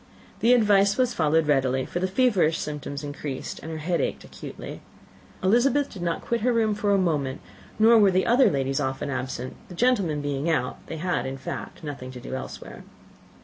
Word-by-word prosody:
The 240 Hz, +2 st, +5 dB
advice 205 Hz, -3 st, +4 dB
was 250 Hz, -2 st, +2 dB
followed 160 Hz, -3 st, +2 dB
readily, 130 Hz, -3 st, +1 dB
for 175 Hz, -, -4 dB
the 185 Hz, -, 0 dB
feverish 190 Hz, -7 st, +2 dB
symptoms 145 Hz, -1 st, -5 dB
increased, 145 Hz, -2 st, -5 dB
and 160 Hz, -, -7 dB
her 160 Hz, -, -4 dB
head 170 Hz, +3 st, -1 dB
ached -, -, -2 dB
acutely. -, -, -9 dB, 0.6 s
Elizabeth 245 Hz, +8 st, +3 dB
did 190 Hz, -, -9 dB
not 170 Hz, -1 st, -1 dB
quit 235 Hz, 0 st, -1 dB
her 250 Hz, +3 st, +2 dB
room 225 Hz, -2 st, +2 dB
for 205 Hz, 0 st, 0 dB
a 200 Hz, -, +4 dB
moment, 150 Hz, -8 st, 0 dB, 0.4 s
nor 225 Hz, +1 st, +6 dB
were 205 Hz, -2 st, +6 dB
the 185 Hz, 0 st, +2 dB
other 250 Hz, +3 st, +5 dB
ladies 135 Hz, -1 st, 0 dB
often 135 Hz, +2 st, -2 dB
absent; 130 Hz, -1 st, -4 dB
the 180 Hz, -, -9 dB
gentlemen 200 Hz, -9 st, +2 dB
being 145 Hz, +2 st, -2 dB
out, 125 Hz, -6 st, -1 dB
they 160 Hz, -, -5 dB
had 175 Hz, -1 st, -1 dB
in 135 Hz, 0 st, -5 dB
fact 130 Hz, -, -7 dB
nothing 140 Hz, -4 st, -6 dB
to 125 Hz, -, -8 dB
do 125 Hz, -, -8 dB
elsewhere. 130 Hz, -, -7 dB
165 Hz, 190 wpm, -25 LUFS, 140-210 Hz, 0.6 s, nor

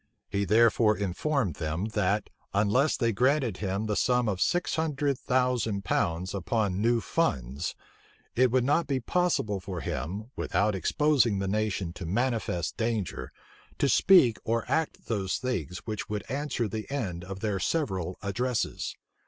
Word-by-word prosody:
He 100 Hz, 0 st, 0 dB
therefore 110 Hz, 0 st, +4 dB
informed 105 Hz, -, -1 dB
them, 80 Hz, +4 st, -2 dB
that, 105 Hz, -1 st, 0 dB, 0.2 s
unless 110 Hz, +9 st, +3 dB
they 115 Hz, -3 st, +2 dB
granted 125 Hz, -1 st, +2 dB
him 100 Hz, +1 st, -2 dB
the 105 Hz, -1 st, -1 dB
sum 125 Hz, +1 st, +2 dB
of 95 Hz, -3 st, -1 dB
six 175 Hz, 0 st, +1 dB
hundred 145 Hz, -3 st, 0 dB
thousand 125 Hz, -6 st, 0 dB
pounds 85 Hz, +3 st, 0 dB
upon 100 Hz, 0 st, 0 dB
new 115 Hz, +1 st, +3 dB
funds, 70 Hz, -, -1 dB, 0.6 s
it 130 Hz, +1 st, +4 dB
would 125 Hz, +1 st, +2 dB
not 145 Hz, +4 st, +2 dB
be 135 Hz, -2 st, 0 dB
possible 125 Hz, -, 0 dB
for 90 Hz, -2 st, -5 dB
him, 95 Hz, -, -4 dB
without 105 Hz, +1 st, +1 dB
exposing 125 Hz, +2 st, +2 dB
the 95 Hz, 0 st, -1 dB
nation 100 Hz, -4 st, -1 dB
to 90 Hz, -, -7 dB
manifest 110 Hz, -5 st, -1 dB
danger, 110 Hz, -, -2 dB, 0.5 s
to -, -, +2 dB
speak 130 Hz, -, +5 dB
or 115 Hz, +1 st, 0 dB
act 160 Hz, -1 st, -1 dB
those 100 Hz, -5 st, -1 dB
things 90 Hz, -, -3 dB
which 110 Hz, -2 st, -4 dB
would 105 Hz, -1 st, -2 dB
answer 135 Hz, -4 st, -1 dB
the 110 Hz, +1 st, -5 dB
end 100 Hz, -12 st, -3 dB
of 95 Hz, +1 st, -7 dB
their 105 Hz, -3 st, -1 dB
several 95 Hz, -, -1 dB
addresses. 120 Hz, +4 st, -2 dB
110 Hz, 150 wpm, -28 LUFS, 95-125 Hz, 0.6 s, speak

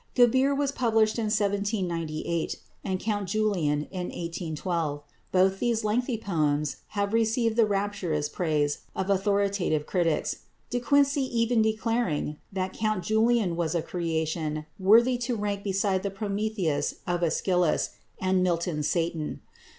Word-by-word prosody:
"Gebir" 260 Hz, +3 st, +4 dB
was 285 Hz, -1 st, +1 dB
published 225 Hz, -4 st, +2 dB
in 225 Hz, -, 0 dB
1798 195 Hz, -6 st, -1 dB, 0.3 s
and 190 Hz, -2 st, -2 dB
"Count 205 Hz, -3 st, -2 dB
Julian" 180 Hz, -9 st, +1 dB
in 180 Hz, -2 st, -3 dB
1812. 165 Hz, -3 st, -3 dB, 0.3 s
Both 190 Hz, +1 st, +3 dB
these 235 Hz, -2 st, +1 dB
lengthy 235 Hz, +3 st, 0 dB
poems 150 Hz, -7 st, 0 dB, 0.2 s
have 200 Hz, +1 st, 0 dB
received 230 Hz, 0 st, +2 dB
the 225 Hz, -2 st, +4 dB
rapturous 195 Hz, -7 st, -1 dB
praise 150 Hz, -2 st, 0 dB, 0.2 s
of 190 Hz, +1 st, -1 dB
authoritative 200 Hz, -5 st, +1 dB
critics, 170 Hz, -4 st, 0 dB, 0.3 s
De 245 Hz, -, 0 dB
Quincey 280 Hz, +2 st, +3 dB
even 235 Hz, -2 st, +1 dB
declaring 220 Hz, -9 st, 0 dB
that 190 Hz, -1 st, -2 dB
Count 215 Hz, -4 st, -1 dB
Julian 220 Hz, -2 st, +2 dB
was 170 Hz, -1 st, -1 dB
a 165 Hz, -, 0 dB
creation 160 Hz, -2 st, -2 dB
worthy 235 Hz, +6 st, +5 dB
to 245 Hz, 0 st, -1 dB
rank 205 Hz, -2 st, -2 dB
beside 195 Hz, -1 st, +1 dB
the 200 Hz, -, -2 dB
Prometheus 195 Hz, -6 st, -1 dB
of 175 Hz, -1 st, -1 dB
Æschylus 175 Hz, 0 st, +1 dB, 0.3 s
and 185 Hz, 0 st, +2 dB
Milton's 170 Hz, -4 st, 0 dB
Satan. 165 Hz, -3 st, -1 dB
195 Hz, 130 wpm, -27 LUFS, 170-220 Hz, 0.3 s, worthy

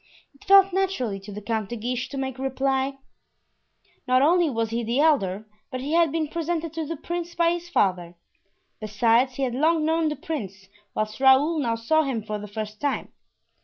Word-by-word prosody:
It 275 Hz, -, -21 dB
fell 390 Hz, 0 st, +7 dB
naturally 360 Hz, -, -1 dB
to 195 Hz, +2 st, -11 dB
the 205 Hz, +1 st, -8 dB
Count 220 Hz, -2 st, -2 dB
de 240 Hz, -, -4 dB
Guiche 245 Hz, +2 st, -3 dB
to 280 Hz, -, -6 dB
make 265 Hz, -1 st, -4 dB
reply; 270 Hz, 0 st, -1 dB, 1.1 s
not 255 Hz, +1 st, +4 dB
only 340 Hz, +2 st, +4 dB
was 225 Hz, -3 st, -2 dB
he 235 Hz, +1 st, -1 dB
the 235 Hz, +4 st, -1 dB
elder, 220 Hz, -10 st, +2 dB, 0.2 s
but 255 Hz, -2 st, -5 dB
he 280 Hz, +4 st, -3 dB
had 335 Hz, -3 st, +4 dB
been 315 Hz, -1 st, -1 dB
presented 330 Hz, 0 st, -3 dB
to 320 Hz, -2 st, -4 dB
the 330 Hz, +1 st, -4 dB
prince 345 Hz, +2 st, -5 dB
by 335 Hz, 0 st, +3 dB
his 345 Hz, 0 st, -4 dB
father. 180 Hz, -, 0 dB, 0.6 s
Besides, 230 Hz, +4 st, +2 dB
he 275 Hz, -, -2 dB
had 250 Hz, -2 st, -1 dB
long 310 Hz, +4 st, +2 dB
known 320 Hz, 0 st, +1 dB
the 300 Hz, -, -3 dB
prince, 195 Hz, -, -6 dB, 0.3 s
whilst 215 Hz, +1 st, -3 dB
Raoul 270 Hz, +5 st, +5 dB
now 235 Hz, -5 st, 0 dB
saw 270 Hz, +8 st, +2 dB
him 260 Hz, -7 st, -2 dB
for 210 Hz, 0 st, -4 dB
the 210 Hz, -, -8 dB
first 215 Hz, 0 st, -6 dB
time. 285 Hz, -1 st, -2 dB
265 Hz, 195 wpm, -25 LUFS, 225-320 Hz, 1.1 s, fell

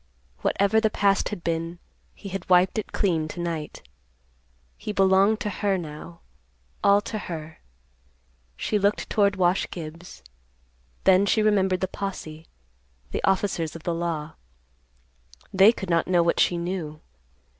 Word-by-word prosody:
Whatever 200 Hz, +3 st, +2 dB
the 220 Hz, -, +3 dB
past 200 Hz, -1 st, +1 dB
had 195 Hz, -5 st, -6 dB
been, 165 Hz, +1 st, -2 dB, 0.4 s
he 200 Hz, -, -9 dB
had 190 Hz, -1 st, -6 dB
wiped 185 Hz, +4 st, +4 dB
it 210 Hz, -, -6 dB
clean 165 Hz, -6 st, 0 dB
to 175 Hz, -, -8 dB
night. 165 Hz, -, -5 dB, 0.9 s
He -, -, -5 dB
belonged 195 Hz, +2 st, +3 dB
to 210 Hz, -, -2 dB
her 200 Hz, 0 st, 0 dB
now, 165 Hz, +1 st, -9 dB, 0.6 s
all 200 Hz, 0 st, +5 dB
to 215 Hz, +1 st, -5 dB
her. 160 Hz, -4 st, -7 dB, 1.0 s
She 210 Hz, -, 0 dB
looked 200 Hz, +1 st, 0 dB
toward 200 Hz, -1 st, +3 dB
Wash 180 Hz, 0 st, +1 dB
Gibbs. 165 Hz, -, -9 dB, 0.8 s
Then 190 Hz, +1 st, +5 dB
she 215 Hz, +2 st, +3 dB
remembered 190 Hz, -3 st, +2 dB
the 190 Hz, -, 0 dB
posse, 165 Hz, -5 st, -6 dB, 0.6 s
the -, -, -3 dB
officers 185 Hz, -5 st, 0 dB
of 165 Hz, -, -9 dB
the 170 Hz, -, -1 dB
law. 165 Hz, -2 st, -3 dB, 1.2 s
They 195 Hz, +3 st, +7 dB
could 190 Hz, -6 st, -6 dB
not 170 Hz, -1 st, +2 dB
know 175 Hz, -2 st, +3 dB
what 170 Hz, -, +1 dB
she 175 Hz, -, +3 dB
knew. 170 Hz, -3 st, -4 dB
185 Hz, 145 wpm, -25 LUFS, 165-200 Hz, 1.2 s, They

